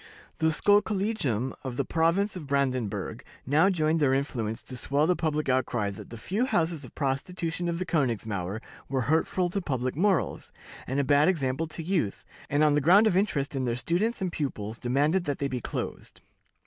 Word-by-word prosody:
The 160 Hz, -, +3 dB
Schulkollegium 195 Hz, -, +1 dB
of 125 Hz, -2 st, -5 dB
the 140 Hz, -, 0 dB
province 170 Hz, +7 st, +1 dB
of 165 Hz, -6 st, -7 dB
Brandenburg 130 Hz, -8 st, -1 dB, 0.2 s
now 155 Hz, +8 st, +4 dB
joined 160 Hz, -3 st, +1 dB
their 135 Hz, -3 st, +3 dB
influence 115 Hz, -6 st, -2 dB
to 130 Hz, -, -8 dB
swell 140 Hz, +4 st, +1 dB
the 180 Hz, +2 st, +3 dB
public 155 Hz, -2 st, -1 dB
outcry 120 Hz, -5 st, +1 dB
that 100 Hz, -, -10 dB
the 115 Hz, -, -8 dB
few 200 Hz, -, -1 dB
houses 165 Hz, -, 0 dB
of 125 Hz, -, -12 dB
prostitution 165 Hz, +5 st, -2 dB
on 170 Hz, -, -1 dB
the 185 Hz, -, -2 dB
Königsmauer 110 Hz, -, -1 dB, 0.3 s
were 135 Hz, -1 st, 0 dB
hurtful 165 Hz, +6 st, +1 dB
to 200 Hz, -, -1 dB
public 130 Hz, -6 st, -2 dB
morals, 190 Hz, +2 st, 0 dB, 0.4 s
and 135 Hz, +2 st, -1 dB
a -, -, +3 dB
bad 145 Hz, +2 st, +4 dB
example 155 Hz, -3 st, 0 dB
to 160 Hz, +1 st, -7 dB
youth, 160 Hz, -, -1 dB, 0.2 s
and, 145 Hz, +2 st, +3 dB
on 150 Hz, -1 st, +5 dB
the 150 Hz, -, +3 dB
ground 190 Hz, +9 st, +6 dB
of 215 Hz, -, +3 dB
interest 150 Hz, -8 st, 0 dB
in 130 Hz, -1 st, -1 dB
their 120 Hz, -1 st, 0 dB
students 190 Hz, -, 0 dB
and 180 Hz, -, -1 dB
pupils, 115 Hz, -8 st, -4 dB
demanded 145 Hz, +9 st, +1 dB
that 145 Hz, -3 st, -1 dB
they 140 Hz, -, -1 dB
be 130 Hz, -2 st, -3 dB
closed. -, -, -5 dB
145 Hz, 185 wpm, -28 LUFS, 130-175 Hz, 0.4 s, ground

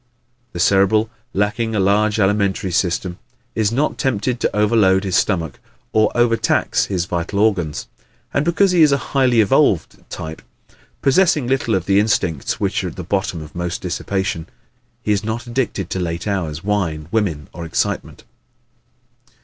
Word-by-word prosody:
The 85 Hz, -, -5 dB
Cerebral, 100 Hz, +4 st, +3 dB, 0.2 s
lacking 110 Hz, +2 st, -1 dB
a -, -, +1 dB
large 105 Hz, +3 st, +2 dB
alimentary 100 Hz, -1 st, +1 dB
system, 90 Hz, 0 st, -1 dB, 0.3 s
is 110 Hz, -1 st, +1 dB
not 140 Hz, +6 st, 0 dB
tempted 125 Hz, -1 st, 0 dB
to -, -, -1 dB
overload 105 Hz, -3 st, +3 dB
his 95 Hz, -2 st, -1 dB
stomach 85 Hz, -8 st, 0 dB, 0.3 s
or 110 Hz, -1 st, +3 dB
overtax 120 Hz, -1 st, +2 dB
his 90 Hz, -3 st, -2 dB
vital 90 Hz, +3 st, -3 dB
organs. 95 Hz, -8 st, +1 dB, 0.5 s
And 140 Hz, -, +2 dB
because 175 Hz, +4 st, +3 dB
he 175 Hz, -2 st, +3 dB
is 150 Hz, -2 st, +6 dB
a 140 Hz, -, +3 dB, 0.2 s
highly 130 Hz, -4 st, +4 dB
evolved 105 Hz, -, +2 dB
type, 80 Hz, 0 st, -7 dB, 0.6 s
possessing 150 Hz, 0 st, +3 dB
little 125 Hz, -3 st, +1 dB
of 95 Hz, -2 st, -1 dB
the 100 Hz, +1 st, +3 dB
instincts 90 Hz, -, 0 dB
which -, -, 0 dB
are -, -, -2 dB
at -, -, -7 dB
the -, -, -6 dB
bottom 95 Hz, -5 st, -2 dB
of 75 Hz, -, -13 dB
most 85 Hz, 0 st, -3 dB
dissipation, 95 Hz, -1 st, -2 dB, 0.6 s
he 105 Hz, -, 0 dB
is 105 Hz, 0 st, +1 dB
not 110 Hz, +2 st, -3 dB
addicted 120 Hz, -7 st, -2 dB
to 95 Hz, -, -1 dB
late 85 Hz, -1 st, -3 dB
hours, 85 Hz, -5 st, -2 dB
wine, 90 Hz, -7 st, -1 dB
women 90 Hz, -10 st, -1 dB
or 85 Hz, -, -7 dB
excitement. 80 Hz, -, -2 dB
100 Hz, 155 wpm, -19 LUFS, 90-115 Hz, 0.6 s, is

